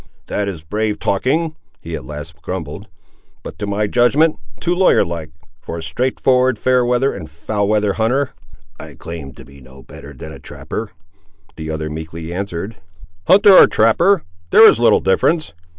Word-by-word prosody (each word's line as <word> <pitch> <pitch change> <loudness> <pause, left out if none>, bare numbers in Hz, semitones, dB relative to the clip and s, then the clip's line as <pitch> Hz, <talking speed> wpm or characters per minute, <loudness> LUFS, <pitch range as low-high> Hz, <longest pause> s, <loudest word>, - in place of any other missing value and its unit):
"This 105 - -2
is 85 -5 -7
brave 105 +5 -2
talking," 155 - 0 0.2
he 80 0 -6
at 75 - -7
length 75 +3 -9
grumbled; 90 +1 -6 0.6
"but - - -9
to 105 - -3
my 100 +1 0
judgment, 130 +9 +2 0.2
too 175 - 0
lawyer 185 +1 +3
like, 85 -2 -6 0.3
for 85 - -6
a 80 - -6
straight 125 +11 -2
forward, 130 -2 +2
fair 125 +3 +2
weather, 125 +3 +1
and 80 -6 -8
foul 100 +6 -3
weather 105 -1 +1
hunter." 130 +6 0 0.5
"I - - -10
claim 80 -5 -8
to - - -14
be 70 0 -16
no 65 +1 -15
better - - -12
than - - -10
a - - -11
trapper," 110 -1 -7 0.7
the 80 0 -7
other 80 0 -3
meekly 80 +2 -7
answered. 100 +2 -5 0.5
"Hunter 200 +1 +7
or - - +9
trapper—there 110 - +3
is - - +4
little - - +4
difference. 155 - +1
100 Hz, 165 wpm, -18 LUFS, 80-125 Hz, 0.7 s, or